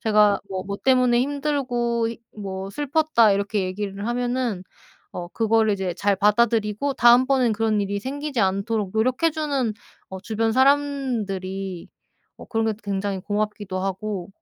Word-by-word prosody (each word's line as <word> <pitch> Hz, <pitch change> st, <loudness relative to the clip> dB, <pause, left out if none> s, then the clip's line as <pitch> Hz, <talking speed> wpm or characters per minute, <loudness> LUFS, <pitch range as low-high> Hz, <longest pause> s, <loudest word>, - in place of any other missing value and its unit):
제가 210 Hz, -2 st, +4 dB
뭐 190 Hz, -1 st, -4 dB
뭐 200 Hz, +1 st, -4 dB
때문에 255 Hz, -2 st, +4 dB
"힘들고 255 Hz, -5 st, -1 dB, 0.3 s
뭐 195 Hz, -1 st, -5 dB
슬펐다." 290 Hz, -4 st, +3 dB
이렇게 200 Hz, 0 st, 0 dB
얘기를 200 Hz, +2 st, -4 dB
하면은 245 Hz, -4 st, -1 dB, 0.5 s
어 175 Hz, -1 st, -6 dB
그거를 225 Hz, +1 st, +2 dB
이제 190 Hz, -2 st, -2 dB
잘 200 Hz, +1 st, +1 dB
받아들이고 215 Hz, +4 st, +2 dB
다음번엔 250 Hz, 0 st, +5 dB
그런 215 Hz, -1 st, +1 dB
일이 200 Hz, 0 st, -3 dB
생기지 275 Hz, +1 st, -3 dB
않도록 200 Hz, +1 st, 0 dB
노력해 255 Hz, +9 st, +2 dB
주는 285 Hz, -7 st, -1 dB, 0.4 s
어 190 Hz, 0 st, -7 dB
주변 225 Hz, +3 st, -1 dB
사람들이 225 Hz, -10 st, 0 dB, 0.5 s
어 -, -, -10 dB
그런 225 Hz, -2 st, -1 dB
게 220 Hz, -, +1 dB
또 210 Hz, -, -12 dB
굉장히 200 Hz, -1 st, -2 dB
고맙기도 205 Hz, -1 st, -3 dB
하고 195 Hz, 0 st, -3 dB
220 Hz, 310 characters per minute, -23 LUFS, 200-250 Hz, 0.5 s, 다음번엔